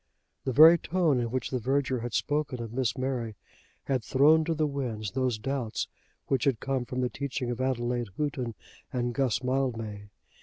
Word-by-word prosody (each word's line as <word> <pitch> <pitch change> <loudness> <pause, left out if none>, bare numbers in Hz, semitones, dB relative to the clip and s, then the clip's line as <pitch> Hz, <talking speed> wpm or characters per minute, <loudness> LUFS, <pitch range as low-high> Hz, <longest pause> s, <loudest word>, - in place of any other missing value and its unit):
The 130 - 0
very 160 +6 +8
tone 165 -7 +1
in 120 -1 -1
which 130 0 -2
the 130 - 0
verger 130 +1 0
had 120 +1 -4
spoken 145 -3 -1
of 115 -1 -6
Miss 130 0 0
Mary 125 -4 -2 0.5
had 130 -4 -1
thrown 150 +6 +5
to 165 0 0
the 155 0 +1
winds 120 -8 -3
those 130 -3 0
doubts 125 -1 -2 0.4
which 130 -3 0
had 135 -6 +2
come 135 -2 -1
from 125 +1 -3
the 125 - +2
teaching 130 -3 -3
of 120 +1 -3
Adelaide 120 -3 -1
Houghton 130 -6 -2 0.4
and 120 -2 -1
Guss 125 -1 0
Mildmay. 115 -6 -2
130 Hz, 180 wpm, -28 LUFS, 120-140 Hz, 0.5 s, very